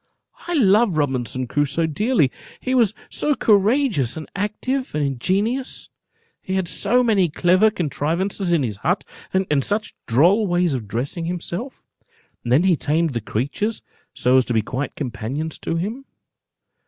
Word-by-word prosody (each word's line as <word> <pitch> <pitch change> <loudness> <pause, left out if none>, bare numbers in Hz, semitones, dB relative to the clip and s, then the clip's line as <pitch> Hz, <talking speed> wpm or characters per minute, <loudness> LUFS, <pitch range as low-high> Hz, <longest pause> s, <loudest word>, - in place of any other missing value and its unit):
I 350 - -1
love 210 - +4
Robinson 130 -3 -1
Crusoe 145 +5 0
dearly, 160 - +1 0.3
he 255 - -2
was 230 -5 +3
so 295 -1 0
courageous, 210 - +2
and 155 - -7
active, 250 - -2
and 150 - +1
ingenious; 200 - -1 0.5
he 190 - -3
had 190 -2 0
so 235 +8 +2
many 200 -7 +3
clever 185 +7 +4
contrivances 175 +1 -1
in 165 -5 +3
his 105 -5 -3
hut, 180 - -1 0.3
and 180 -7 +1
such 215 +7 -2
droll 175 - +4
ways 175 -3 +1
of 120 -5 -4
dressing 135 - -3
himself; 180 +8 -5 0.6
and 120 - -3
then 140 +7 +5
he 185 -2 +4
tamed 160 +2 0
the 120 -3 -3
creatures 140 - -2 0.3
so 125 +1 +3
as 130 - +3
to 120 - -2
be 110 - +2
quite 130 +5 -4
companions 135 +4 -4
to 165 - -3
him. 215 +11 -3
175 Hz, 155 wpm, -21 LUFS, 140-210 Hz, 0.6 s, then